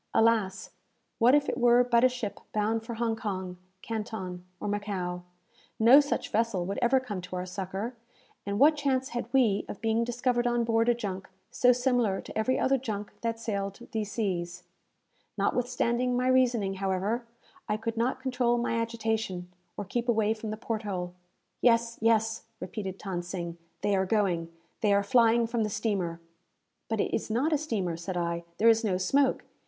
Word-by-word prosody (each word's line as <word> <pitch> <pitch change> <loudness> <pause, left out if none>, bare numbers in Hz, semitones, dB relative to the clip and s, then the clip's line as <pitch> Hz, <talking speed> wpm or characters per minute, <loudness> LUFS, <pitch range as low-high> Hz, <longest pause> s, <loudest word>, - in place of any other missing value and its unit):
Alas! 220 -4 +2 0.5
what 245 +4 +6
if 290 -1 +2
it - - -2
were 240 0 +6
but 240 -1 +3
a 255 - +7
ship 245 -5 -5
bound 220 +1 0
for 235 0 -6
Hong 230 0 0
Kong, 190 -5 -4 0.3
Canton, 210 -5 -5 0.2
or - - -4
Macao? 195 -4 -2 0.6
No 240 +6 +8
such 290 0 -1
vessel 220 -5 +1
would 195 +2 -3
ever 255 +2 +4
come 210 -8 -5
to 180 +1 -7
our 180 0 -3
succour, 195 +5 -4 0.5
and 200 0 -2
what 295 +6 +6
chance 270 -2 0
had 240 -1 -4
we 235 -7 +3
of - - -6
being 225 +1 +1
discovered 245 0 0
on 240 0 +1
board 230 0 +2
a 240 - +4
junk 195 -5 -5 0.2
so 250 - +5
similar 245 -5 +1
to - - -10
every 235 +4 +1
other 270 0 +2
junk 210 -4 -4
that 230 -1 -2
sailed 200 -3 -3
these 215 -3 -2
seas? 180 -5 -2 0.7
Notwithstanding 245 0 +1
my 250 +1 +1
reasoning, 245 -6 +3
however, 195 +5 -1 0.4
I 210 - +1
could 230 +1 -3
not 245 +3 0
control 250 -2 +1
my 235 -1 0
agitation, 220 -6 -2 0.2
or 205 - -4
keep 240 +5 -2
away 220 -2 +3
from 220 0 -6
the 215 - -4
port 225 -1 -3
hole. 180 -4 -4 0.5
"Yes, 230 -1 +3
yes," 225 0 +2
repeated 190 0 -5
Than 185 -3 -3
Sing, 170 -1 -6 0.2
"they 205 -1 +2
are 190 0 +1
going. 180 -6 +1 0.3
They 210 -3 +3
are 200 0 +3
flying 230 +2 +4
from 230 0 -1
the 215 - 0
steamer!" 195 -5 -1 0.7
"But 220 -1 -1
it - - 0
is 220 - -1
not 260 +9 +1
a - - +4
steamer," 205 - -2
said 180 +2 -4
I. 170 0 -1
"There 225 - +3
is 225 0 +5
no 195 -4 +1
smoke. 265 +9 +2
225 Hz, 180 wpm, -29 LUFS, 195-240 Hz, 0.7 s, No